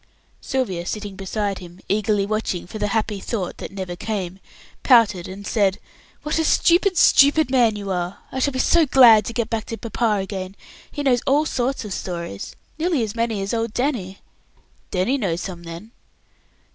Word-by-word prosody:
Sylvia, 190 Hz, -10 st, -2 dB
sitting 205 Hz, -2 st, -5 dB
beside 195 Hz, +1 st, -3 dB
him, 175 Hz, 0 st, -12 dB
eagerly 205 Hz, 0 st, +1 dB
watching 215 Hz, -4 st, -2 dB
for 215 Hz, +5 st, -8 dB
the 210 Hz, -, 0 dB
happy 215 Hz, -1 st, -1 dB
thought 195 Hz, -4 st, -4 dB
that -, -, -7 dB
never 190 Hz, -2 st, -5 dB
came, 190 Hz, -2 st, -4 dB, 0.4 s
pouted 220 Hz, -8 st, +4 dB
and 195 Hz, +2 st, -9 dB
said, 200 Hz, -3 st, +1 dB, 0.5 s
"What 300 Hz, +2 st, -1 dB
a -, -, +2 dB
stupid, 355 Hz, +4 st, +3 dB
stupid 285 Hz, 0 st, +5 dB
man 240 Hz, -5 st, +3 dB
you 200 Hz, -1 st, -5 dB
are! 180 Hz, 0 st, -2 dB
I 260 Hz, -, -3 dB
shall 280 Hz, +2 st, +1 dB
be -, -, -3 dB
so 325 Hz, +4 st, +3 dB
glad 240 Hz, -5 st, +7 dB
to 235 Hz, -, -4 dB
get 230 Hz, -1 st, -2 dB
back 225 Hz, -2 st, -2 dB
to 225 Hz, -, -6 dB
papa 230 Hz, -1 st, -1 dB
again. 190 Hz, 0 st, -5 dB, 0.4 s
He 290 Hz, -, -4 dB
knows 250 Hz, -4 st, +3 dB
all 290 Hz, +3 st, +3 dB
sorts 260 Hz, -4 st, -2 dB
of 205 Hz, -, -5 dB
stories, 170 Hz, -, -5 dB, 0.2 s
nearly 320 Hz, -6 st, +1 dB
as 210 Hz, -2 st, -4 dB
many 230 Hz, -3 st, -1 dB
as 195 Hz, -, -3 dB
old 225 Hz, -1 st, -2 dB
Danny." 235 Hz, -8 st, -1 dB, 0.7 s
"Danny 200 Hz, +10 st, 0 dB
knows 175 Hz, -6 st, -1 dB
some, 180 Hz, -3 st, -6 dB
then?" 170 Hz, +6 st, -9 dB
215 Hz, 180 wpm, -22 LUFS, 190-245 Hz, 0.7 s, glad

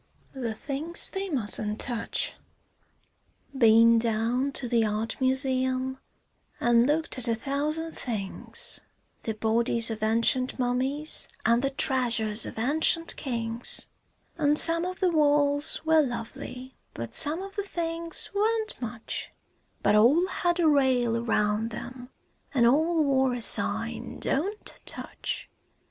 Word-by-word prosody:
THE 240 Hz, -5 st, -5 dB
THINGS 300 Hz, +7 st, -1 dB
THEY 390 Hz, 0 st, -4 dB
MUSTN'T 215 Hz, -, +2 dB
TOUCH 240 Hz, -3 st, -2 dB, 1.2 s
Been 230 Hz, -2 st, +5 dB
down 230 Hz, +4 st, -1 dB
to 255 Hz, -, -1 dB
the 235 Hz, -1 st, +1 dB
art 215 Hz, +4 st, -3 dB
museum 260 Hz, 0 st, 0 dB, 0.6 s
an' 240 Hz, 0 st, +3 dB
looked 305 Hz, -2 st, -1 dB
at 250 Hz, -, +4 dB
a 230 Hz, -, 0 dB
thousand 295 Hz, +6 st, -3 dB
things, 215 Hz, -10 st, -1 dB, 0.4 s
The 220 Hz, -, -4 dB
bodies 230 Hz, +1 st, +1 dB
of 220 Hz, -1 st, -6 dB
ancient 230 Hz, +4 st, 0 dB
mummies 260 Hz, +4 st, 0 dB, 0.2 s
an' 235 Hz, +1 st, +3 dB
the 275 Hz, +2 st, -1 dB
treasures 235 Hz, -5 st, +1 dB
of -, -, -10 dB
ancient 315 Hz, +7 st, +2 dB
kings, 230 Hz, -3 st, +1 dB, 0.5 s
An' 295 Hz, -1 st, +2 dB
some 335 Hz, +2 st, +6 dB
of 370 Hz, +1 st, -6 dB
the 370 Hz, -2 st, +2 dB
walls 290 Hz, -1 st, +3 dB
were 320 Hz, 0 st, +4 dB
lovely, 250 Hz, 0 st, -7 dB, 0.2 s
but 115 Hz, 0 st, -7 dB
some 320 Hz, +6 st, +4 dB
of 390 Hz, 0 st, -10 dB
the 410 Hz, -, -2 dB
things 335 Hz, -3 st, -5 dB
weren't 435 Hz, -1 st, -1 dB
much, 235 Hz, -1 st, -6 dB, 0.5 s
But -, -, +2 dB
all 250 Hz, +12 st, +4 dB
had 350 Hz, -1 st, -2 dB
a 335 Hz, -, +3 dB
rail 260 Hz, -5 st, +2 dB
around 225 Hz, -1 st, -1 dB
'em, 250 Hz, 0 st, -9 dB, 0.5 s
an' 240 Hz, -3 st, +3 dB
all 315 Hz, +6 st, +2 dB
wore 265 Hz, -2 st, +1 dB
a 245 Hz, -, -5 dB
sign -, -, +1 dB
"Don't 395 Hz, +10 st, -3 dB
touch." -, -, -4 dB
260 Hz, 130 wpm, -26 LUFS, 230-310 Hz, 1.2 s, some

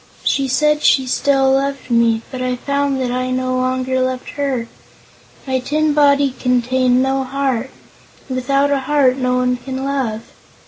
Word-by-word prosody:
She 275 Hz, -1 st, +1 dB
said 300 Hz, +3 st, +2 dB
she 265 Hz, -3 st, +3 dB
still 270 Hz, +1 st, +2 dB
loved 275 Hz, -1 st, -1 dB
me, 230 Hz, -1 st, +2 dB
but 255 Hz, -2 st, -5 dB
I 255 Hz, 0 st, -1 dB
found 280 Hz, +1 st, -1 dB
that 250 Hz, -2 st, -1 dB
I 255 Hz, +1 st, -2 dB
no 255 Hz, 0 st, -1 dB
longer 255 Hz, 0 st, -1 dB
loved 255 Hz, 0 st, -2 dB
her. 270 Hz, -5 st, -2 dB, 0.8 s
My 260 Hz, -1 st, -1 dB
tin 300 Hz, +4 st, 0 dB
body 280 Hz, -2 st, +3 dB
contained 250 Hz, 0 st, +2 dB
no 270 Hz, 0 st, 0 dB
heart, 265 Hz, -2 st, -2 dB, 0.6 s
and 260 Hz, -, -4 dB
without 275 Hz, +3 st, +1 dB
a 280 Hz, -, +2 dB
heart 270 Hz, -2 st, +2 dB
no 250 Hz, -1 st, 0 dB
one 250 Hz, 0 st, +1 dB
can 265 Hz, +1 st, -5 dB
love. 260 Hz, -6 st, -2 dB
260 Hz, 165 wpm, -18 LUFS, 255-275 Hz, 0.8 s, she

